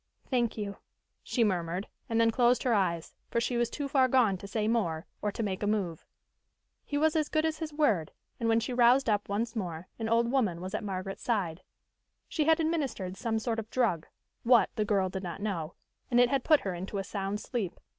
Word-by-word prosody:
"Thank 240 -3 +1
you," 200 -2 -4 0.4
she 240 - +1
murmured, 180 -2 -1 0.2
and 230 0 +1
then 230 0 +4
closed 245 +1 +3
her 250 - +2
eyes, 170 -5 0 0.2
for 235 - +1
she 240 +1 -1
was 240 -1 +1
too 285 -1 -3
far 265 -2 +4
gone 245 -6 +3
to 200 - -8
say 215 +1 -1
more, 180 -8 0 0.2
or 210 - 0
to 225 - -3
make 195 -2 -2
a 205 - 0
move. 195 -6 -1 0.8
He 290 - -3
was 315 +1 +3
as 310 -2 +1
good 310 0 +1
as 315 -1 -1
his 320 -2 -4
word, 225 - +1 0.3
and 230 -1 0
when 225 0 +4
she 245 - -3
roused 245 +2 +5
up 210 -2 +1
once 225 +4 -1
more 175 -4 -4
an 225 0 -2
old 235 +1 +3
woman 215 -11 +1
was 185 +2 -6
at 215 - -2
Margaret's 195 -1 -4
side. 190 -7 -1 0.7
She 310 -4 0
had 320 +1 +4
administered 280 - -1
some 225 +2 -1
sort 225 0 -1
of 220 0 -6
drug 205 -12 0 0.3
what, 240 -1 +5
the 215 - 0
girl 200 -3 +2
did 190 +1 -4
not 175 -1 -5
know 180 -6 -3 0.3
and 245 - +3
it 245 0 +6
had 275 -2 +1
put 310 -3 +5
her 190 - -3
into 190 +3 -5
a 195 - -1
sound 200 +1 -3
sleep. 220 -7 -4
220 Hz, 220 wpm, -30 LUFS, 190-245 Hz, 0.8 s, it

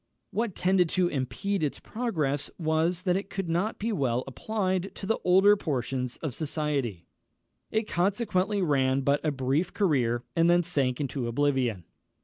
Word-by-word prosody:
What 215 -1 -1
tended 180 -2 +3
to 180 -1 +3
impede 180 +8 -2
its 150 -3 -1
progress 155 - -2
was, 165 +2 0
that 180 -2 +2
it 195 +1 -3
could 195 -2 -3
not 175 +7 0
be 225 +3 -2
well 130 - 0
applied 190 - -2
to - - -7
the 225 +3 0
older 190 +3 +6
portions 130 - -2
of 150 -5 -2
society. 140 - -2 0.6
It 220 0 -1
consequently 195 +1 +1
ran 135 -4 +2
but 140 +2 +1
a 155 - +2
brief 135 +5 -1
career, 125 - +1
and 165 +1 +4
then 175 0 +4
sank 140 -7 0
into 135 -3 -2
oblivion. 125 -6 0
160 Hz, 155 wpm, -28 LUFS, 135-195 Hz, 0.6 s, older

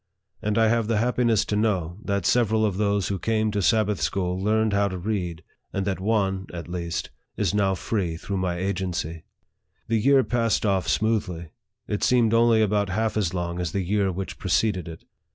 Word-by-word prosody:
And 105 0 -1
I 110 -1 +5
have 115 -1 +1
the 115 -1 +1
happiness 120 -1 +2
to 105 - -2
know, 95 -5 0
that 100 -3 -1
several 110 -2 +3
of 100 -3 -1
those 100 -2 +1
who 100 -2 -2
came 110 +2 0
to 105 -1 -1
Sabbath 105 -3 +2
school 90 +4 -1
learned 110 0 +2
how 100 0 +3
to 95 -2 -4
read; 90 -4 -3 0.3
and 100 -1 -2
that 95 -2 -1
one, 95 -2 0
at 85 -1 -7
least, 85 -1 -4 0.3
is - - 0
now 100 -2 +2
free 90 -4 -2
through 100 +3 -4
my 90 -2 -1
agency. 90 -4 -3 0.6
The 115 -1 +2
year 135 +2 +5
passed 115 -3 0
off 95 -3 +1
smoothly. 100 -7 -1 0.4
It 105 - -2
seemed 120 -3 +3
only 115 -1 +4
about 105 -1 +1
half 110 +4 -1
as 95 -5 0
long 85 0 -3
as 90 -3 -3
the 100 - 0
year 100 +1 +1
which 95 +2 -6
preceded 95 -2 0
it. 80 -1 -9
100 Hz, 190 wpm, -25 LUFS, 90-110 Hz, 0.6 s, I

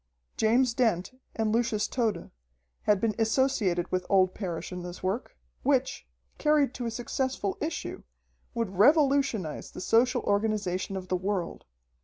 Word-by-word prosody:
James 235 +2 +3
Dent 225 -8 +1 0.2
and 220 -1 0
Lucius 225 -2 +1
Tode 220 -9 -2 0.5
had 210 -2 +4
been 220 +1 +1
associated 220 -7 +1
with 185 0 0
old 185 -1 +4
Parrish 180 -5 -5
in 180 0 -5
this 175 +1 -8
work, 190 - -3 0.2
which, - - 0 0.3
carried 295 -4 +3
to 245 -2 -4
a - - 0
successful 240 -2 -2
issue, 315 +2 -4 0.5
would 200 -5 -3
revolutionize 275 - +3
the - - -10
social 245 +6 +2
organization 200 -2 0
of 185 -1 -7
the 185 - +1
world. 185 -1 -3
215 Hz, 140 wpm, -28 LUFS, 185-245 Hz, 0.5 s, had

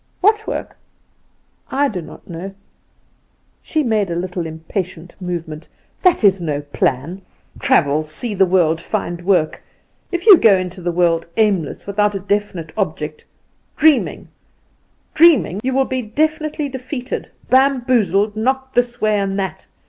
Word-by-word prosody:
"What 430 +2 +2
work?" - - -5 0.9
"I 285 +1 +1
do 190 -8 -4
not - - -13
know." 185 +3 -7 1.1
She 310 -1 -1
made 215 -6 +1
a 170 - -2
little 180 -1 -3
impatient 165 +1 -6
movement. 165 -3 -5 0.3
"That 365 - +3
is 195 -2 +4
no 150 -3 -2
plan; 145 +4 -2 0.4
travel 150 0 +2
see 155 +9 -4
the 190 -1 +3
world 165 -3 +2
find 175 -4 -3
work! 180 -4 +1 0.5
If 350 0 -3
you 410 -5 +10
go 215 -8 +6
into 185 0 -4
the 175 0 -1
world 170 -1 +1
aimless, 200 -9 0
without 205 +1 0
a - - -2
definite 195 -4 -2
object, 155 -6 -3 0.5
dreaming 310 -3 +2 0.8
dreaming, 310 - +5
you 260 - 0
will 265 +1 +2
be 260 -1 -2
definitely 310 +5 -1
defeated, 260 -1 -5 0.2
bamboozled, 240 -7 +3
knocked 265 +4 -1
this 240 0 0
way 215 -1 +2
and 195 0 -1
that. 190 -1 -4
200 Hz, 140 wpm, -19 LUFS, 170-255 Hz, 1.1 s, you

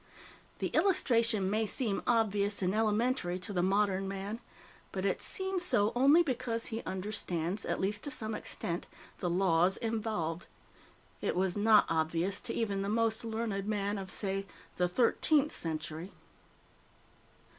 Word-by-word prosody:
The - - -2
illustration 230 - +3
may 215 +2 0
seem 215 -3 -1
obvious 205 -4 +1
and 185 +1 +1
elementary 215 -3 +1
to 185 +2 -4
the 180 - +1
modern 195 0 +1
man, 195 +3 -4 0.5
but - - -3
it - - 0
seems 380 -1 -1
so 210 - +3
only 280 +7 +6
because 245 -5 -2
he 225 0 -3
understands, 185 -1 -3
at - - -1
least 205 +2 -1
to - - -3
some 220 -5 -2
extent, 175 -4 -3 0.3
the 180 - -1
laws 180 0 +3
involved. 215 -7 -2 0.7
It - - -1
was 185 0 +1
not 210 0 +5
obvious 165 +4 0
to - - -4
even 205 -4 -1
the 200 - -2
most 225 0 +1
learned 220 -3 -3
man 205 -1 -1
of, 190 -1 -7
say, 195 0 -1 0.3
the 180 - +2
Thirteenth 275 - +2
Century. 160 +2 -4
205 Hz, 145 wpm, -32 LUFS, 185-225 Hz, 0.7 s, only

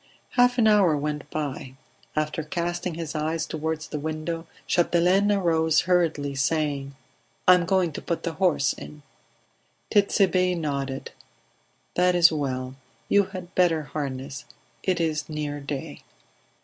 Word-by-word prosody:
Half 245 0 +4
an 230 - +4
hour 195 -8 +5
went 150 0 -3
by; 135 -4 -4 0.4
after 155 +1 -1
casting 175 +2 -3
his 165 -2 -5
eyes 160 +1 -1
toward 160 0 -3
the 155 -1 -5
window 160 +2 -4 0.2
Chapdelaine 180 +4 +3
arose 160 -5 +3
hurriedly, 165 -6 +1
saying. 140 -1 -1 0.5
"I 185 - +10
am 180 -1 +3
going 185 -2 +2
to - - -6
put 170 - -3
the 170 - -2
horse 155 -7 +2
in." 150 -1 -11 0.9
Tit'Sebe 190 -3 +3
nodded. 140 -4 -3 0.8
"That 180 0 +3
is 170 -1 +7
well; 130 -4 -2 0.4
you 200 -1 +4
had 185 -2 -9
better 165 -4 +3
harness; 140 0 -5 0.4
it 185 -2 0
is 160 -2 -1
near 150 -1 -3
day." 140 -1 -6
160 Hz, 135 wpm, -25 LUFS, 145-180 Hz, 0.9 s, I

